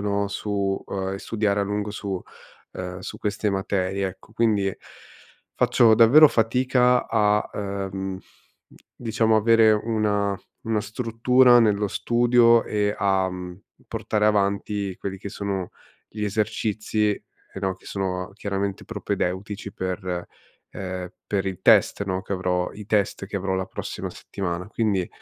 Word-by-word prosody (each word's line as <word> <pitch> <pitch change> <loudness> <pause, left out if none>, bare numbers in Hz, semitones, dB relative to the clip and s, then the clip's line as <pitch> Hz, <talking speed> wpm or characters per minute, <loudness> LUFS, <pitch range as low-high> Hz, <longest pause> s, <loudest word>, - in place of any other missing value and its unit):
no, 100 0 0
su 100 -1 -2
uhm, 95 -1 -3
e - - -5
studiare 105 -1 0
a - - +2
lungo 105 +1 -2
su 100 -3 -4 0.5
uhm, 90 0 -6
su - - -7
queste 105 0 -1
materie, 95 0 -1
ecco. 95 +3 -14
Quindi, 105 -4 +1 0.8
faccio 115 -2 +5
davvero 125 +8 +8
fatica 125 +2 +2
a, 105 -2 +2
uhm, 95 -1 -4
d 95 - -26 0.2
diciamo, 110 -1 +1
avere 110 0 +5
una 105 -2 0 0.3
una 110 -1 0
struttura 120 +3 +4
nello 105 -2 +2
studio, 120 +2 +4
e 105 -1 0
a, 95 -1 +1
mhmm, 90 0 -6
mhmm, 90 - -16 0.3
portare 105 -1 0
avanti 100 -1 0
quelli 95 -1 -4
che 100 - -7
sono 100 -3 -3 0.4
gli 105 -1 -4
esercizi 105 0 0
e - - -9 0.4
no, 95 -1 -1
che - - -20
sono 95 -1 -3
chiaramente 100 -1 -3
propedeutici 100 -1 -3
per 90 -1 -4 0.4
ehm, 90 -1 -5 0.2
per 100 -2 -1
il 95 -2 -4
test, 100 - +4
no, 95 -1 -2
che 100 - -6
avrò 90 -1 -1
i 105 - -9
test 105 -2 0
che 100 - -4
avrò 95 0 -1
la 95 0 -1
prossima - - -5
settimana. 90 -1 -5
Quindi 105 -5 0
100 Hz, 145 wpm, -24 LUFS, 95-110 Hz, 0.8 s, davvero